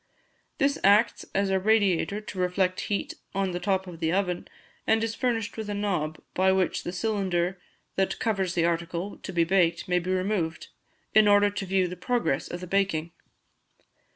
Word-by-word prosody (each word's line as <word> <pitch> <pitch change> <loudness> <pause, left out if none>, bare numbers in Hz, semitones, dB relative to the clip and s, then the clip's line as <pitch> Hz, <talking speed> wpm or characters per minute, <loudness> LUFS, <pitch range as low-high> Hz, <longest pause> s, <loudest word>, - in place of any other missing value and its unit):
This 280 +1 +1
acts 210 +3 +4
as 195 0 +1
a 190 - +3
radiator 200 -1 +2
to 205 -3 -8
reflect 185 0 +1
heat 205 - -1 0.2
on 195 -1 0
the 175 - -3
top 190 0 0
of 175 -3 -9
the 160 -1 0
oven, 180 -1 -1 0.4
and 220 0 +3
is 225 -1 -1
furnished 225 -3 -1
with 220 -1 -4
a 205 - -2
knob, 180 -7 -1
by 190 +1 +3
which 190 -2 +1
the - - -4
cylinder 185 -2 -1 0.4
that 190 0 +1
covers 195 -6 -1
the 170 -1 +2
article 170 +3 -2
to - - -7
be 170 -2 +2
baked 170 -1 +2
may 180 0 +2
be 175 +1 -5
removed, 185 -3 -1 0.4
in 215 0 +6
order 205 0 +5
to 200 -1 -4
view 190 -1 +2
the 180 - -6
progress 210 - 0
of 175 - -6
the - - -5
baking. 175 -4 0
190 Hz, 180 wpm, -27 LUFS, 175-205 Hz, 0.4 s, in